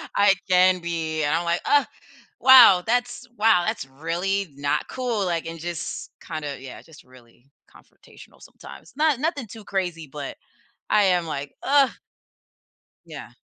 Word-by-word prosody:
I 200 -1 +5 0.2
can 185 0 +4
be. 165 -2 -3
And 145 +2 +1
I'm 170 - -1
like, 170 0 0
"Ugh. 290 0 +3 0.6
Wow, 245 -9 +8
that's 245 +1 -1
wow. 215 -5 +4
That's - - -3
really 170 +8 -3
not 145 0 -2
cool," 240 -5 -2
like, 170 -3 -2
and 165 0 -7
just 170 -1 -6
kinda 150 -3 -6
yeah, 130 -1 -10
just 160 -2 -17
really 125 +1 -21 0.2
confrontational - - -19
sometimes. - - -14
Not 300 -3 +2
nothing 295 -5 -2
too 220 +1 -12
crazy, 175 -5 -3
but 140 0 -7 0.5
I 210 -1 +4
am 180 -2 +2
like, 145 -2 -5
"Ugh." 275 -1 +4 1.2
Yeah. - - -11
175 Hz, 145 wpm, -23 LUFS, 155-225 Hz, 1.2 s, Wow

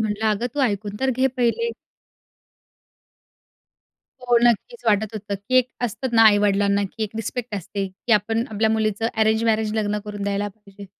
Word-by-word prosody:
म्हटलं, 215 0 -1
"अगं 215 +3 -1
तू 290 - -1
ऐकून 205 -3 -1
तर 265 0 +2
घे 260 +1 +3
पहिले." 255 - +1 2.5
हो 245 -1 +3
नक्कीच 240 - +1
वाटत 215 0 +1
होतं, 205 -1 -4
की 200 +6 -5
एक 255 0 +1 0.2
असतं 240 +3 -5
ना 225 - +7
आई-वडिलांना, 205 -1 +4
की 220 +3 -6
एक 210 - -7
रिस्पेक्ट 225 +1 -4
असते, 200 +1 -4
की 190 +5 -3
आपण 225 +2 +2
आपल्या 220 +1 +1
मुलीचं 220 0 0
अरेंज 220 +1 +2
मॅरेज 220 -1 +1
लग्न 210 -1 0
करून 205 -1 -6
द्यायला 200 +1 -1
पाहिजे. 200 -1 -14
215 Hz, 165 wpm, -22 LUFS, 205-230 Hz, 2.5 s, ना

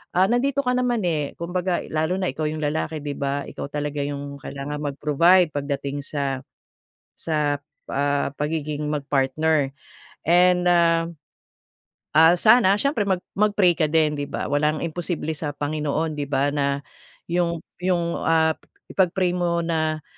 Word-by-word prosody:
ah, 185 +2 +5
nandito 275 +4 +1
ka 250 -1 +1
naman, 245 -3 0
eh. 150 -4 -1
Kumbaga 180 +1 -1
lalo 160 +3 0
na 185 - 0
ikaw 155 - -3
yung 155 0 -4
lalaki 155 +1 -1
'di 145 -1 -4
ba 140 0 -1
ikaw - - -6
talaga 145 0 -3
yung 140 0 -5
kailangan 145 +2 -5
mag-provide 150 +5 +3
pag 145 - -1
dating 140 0 -3
sa, 140 -3 -2 0.8
sa, 150 -3 0 0.3
ah, 140 0 0
pagiging 150 0 -2
mag-partner 145 0 +1 0.6
and, 180 +1 +4
ah, 165 -1 +4 1.1
ah, 160 +2 +7
sana 215 0 +5
siyempre 280 -6 +1
mag 185 -2 +1 0.2
mag-pray 205 -3 +4
ka 155 -3 +2
din 155 -2 +3
'di 145 - -3
ba - - -3
walang 150 +1 +1
imposible 170 -1 -3
sa 150 -1 -3
Panginoon 150 +2 -2
'di 145 -1 -3
ba? 140 0 +2
na 140 -1 0 0.5
'yong, 170 -1 +1 0.2
'yong, 170 -2 0
ah, 160 -1 +3 0.4
ipag-pray 185 -1 +2
mo 170 -1 0
na, 155 -2 -1
155 Hz, 145 wpm, -23 LUFS, 145-175 Hz, 1.1 s, ah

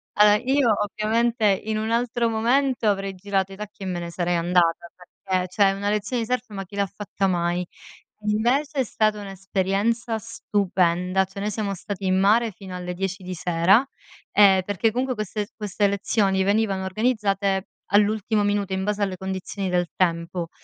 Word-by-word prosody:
Allora, 210 0 +6
io 260 0 +2
ovviamente 225 +3 0 0.2
in 220 0 -1
un 220 +1 -2
altro 235 0 +1
momento, 240 +2 +1
avrei 195 -1 0
girato 195 0 -1
i - - -8
tacchi 210 0 -9
e - - -4
me 180 -2 -2
ne 170 0 -6
sarei 175 0 -1
andata, 170 0 +2
perché 185 +1 -3
cioè 195 +1 +3
una 200 +1 -2
lezione 215 +3 -1
di - - -6
surf, 250 -1 -1
ma 195 -2 -5
chi 200 - -13
l'ha 200 -1 +1
fatta 200 0 -3
mai? 175 0 0 0.6
Invece 250 +8 +1
è - - +4
stata 215 -2 0
un'esperienza 200 +4 -1
stupenda, 190 -4 0
cioè 195 +1 -9
noi 210 - -1
siamo 205 -1 -2
stati 195 +2 -6
in 185 0 +2
mare 220 +4 +3
fino 190 -1 -9
alle 180 0 -5
10 185 +1 -4
di 185 0 -5
sera, 180 +6 +3 0.5
ehm, 195 -2 +6
perché 205 +3 0
comunque 255 +2 -1
queste 210 -1 -3
queste 205 -1 0
lezioni 200 -1 +1
venivano 200 -1 +1
organizzate 200 -2 0 0.3
all'ultimo 210 +1 +2
minuto 205 -1 0
in 190 0 -1
base 210 +1 -1
alle 190 -2 -2
condizioni 190 +1 -4
del 175 -1 +1
tempo, 170 -1 -1
200 Hz, 170 wpm, -24 LUFS, 185-220 Hz, 0.6 s, Allora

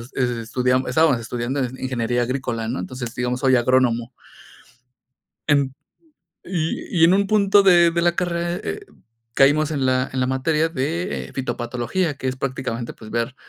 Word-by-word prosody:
estudiamos 125 +1 0
estábamos 145 -2 +3
estudiando 120 +4 -3 0.2
ingeniería 120 -2 -1
agrícola, 120 -3 -3
¿no? 125 - -3
Entonces, 125 -2 -6
digamos, 125 0 -2
soy 130 -1 +3
agrónomo. 120 -1 +2 1.4
En, 140 -3 +2 0.7
y 170 0 -3
y - - +10
en 175 +3 +6
un 200 0 +2
punto 205 -1 +4
de 175 -3 +6
de 170 0 0
la 175 0 +2
carrera, 175 -1 -1
eh, 420 - -4 0.5
caímos 145 +3 +4
en 140 -4 0
la 130 +1 +1
en 130 - -3
la 130 - +1
materia 150 +5 +1
de, 165 +3 -3
eh, - - -14
fitopatología, 125 +6 -2
que - - -4
es 130 - -2
prácticamente, 125 -3 -4
pues, 110 -1 -12
ver, 120 +2 -1
130 Hz, 155 wpm, -22 LUFS, 125-165 Hz, 1.4 s, y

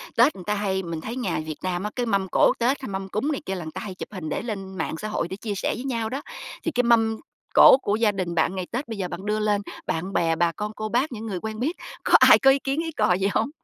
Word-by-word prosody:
Tết 250 +6 +5
người 185 - -10
ta 210 - -1
hay 190 -2 -1
mình 165 -2 -5
thấy 230 +7 -5
nhà 250 -9 -1
Việt 155 -1 -5
Nam 185 0 -2
á, 210 - -2
cái 245 -1 -1
mâm 200 -3 0
cỗ - - +5
Tết 260 +4 +1
hay 260 - -6
mâm 190 0 -4
cúng 265 +11 -1
này 280 - -3
kia 190 - -2
là 175 - -5
người 155 - -6
ta - - -6
hay 190 -3 -6
chụp - - -7
hình 170 -5 -5
để - - -2
lên 195 -5 -6
mạng 160 - -2
xã 215 - -5
hội 215 -5 -2
để 190 - -5
chia 205 0 -4
sẻ - - -1
với 250 - -6
nhau 230 -4 -2
đó, 270 +4 -4 0.4
thì 330 - -1
cái 250 -2 +1
mâm 225 -2 +3 0.4
cỗ - - +9
của 205 - 0
gia 220 -2 +3
đình 185 -3 -3
bạn 165 +3 +1
ngày 185 -1 -4
Tết 250 +4 -3
bây 225 - -5
giờ 190 -2 -2
bạn 190 +2 -7
đưa 215 +1 0
lên 210 -1 +1 0.2
bạn 180 +4 -3
bè, 165 -2 +2
bà 170 0 +2
con 210 +4 -5
cô 215 0 -4
bác, 255 +5 +1
những 225 -1 -6
người 185 -4 -3
quen 220 +2 -5
biết 310 +8 -1 0.3
có - - -1
ai - - +8
có 270 - +6
ý 275 - +2
kiến 275 +2 -2
ý 330 - -4
cò 215 - +2
gì 190 +2 +1
hông? - - +1
210 Hz, 310 wpm, -24 LUFS, 185-235 Hz, 0.4 s, cỗ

